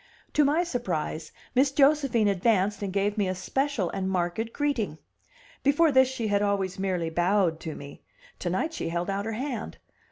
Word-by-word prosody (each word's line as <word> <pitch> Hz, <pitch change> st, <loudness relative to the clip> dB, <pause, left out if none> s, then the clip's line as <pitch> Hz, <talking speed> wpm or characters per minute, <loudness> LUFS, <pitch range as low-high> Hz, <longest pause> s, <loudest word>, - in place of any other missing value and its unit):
To 300 Hz, -, +4 dB
my 300 Hz, +5 st, +3 dB
surprise, 175 Hz, -, -3 dB, 0.2 s
Miss 265 Hz, +2 st, +3 dB
Josephine 275 Hz, -6 st, +3 dB
advanced 200 Hz, +1 st, +2 dB
and 200 Hz, -2 st, -2 dB
gave 200 Hz, +2 st, 0 dB
me 200 Hz, -, +2 dB
a 185 Hz, -, -1 dB
special 230 Hz, 0 st, -1 dB
and 190 Hz, -1 st, -2 dB
marked 185 Hz, +5 st, -1 dB
greeting. 235 Hz, -, -1 dB, 0.6 s
Before 290 Hz, +3 st, +4 dB
this 260 Hz, -1 st, +5 dB
she 255 Hz, -4 st, -3 dB
had 205 Hz, -1 st, +2 dB
always 195 Hz, -2 st, 0 dB
merely 180 Hz, -4 st, -1 dB
bowed 175 Hz, -1 st, +2 dB
to 160 Hz, -2 st, -6 dB
me; 140 Hz, 0 st, -10 dB, 0.4 s
to 175 Hz, -, -2 dB
night 190 Hz, -, -1 dB
she 325 Hz, -, -3 dB
held 175 Hz, +3 st, -2 dB
out 200 Hz, +1 st, -2 dB
her 225 Hz, -, -3 dB
hand. 250 Hz, 0 st, -4 dB
205 Hz, 180 wpm, -27 LUFS, 185-265 Hz, 0.6 s, this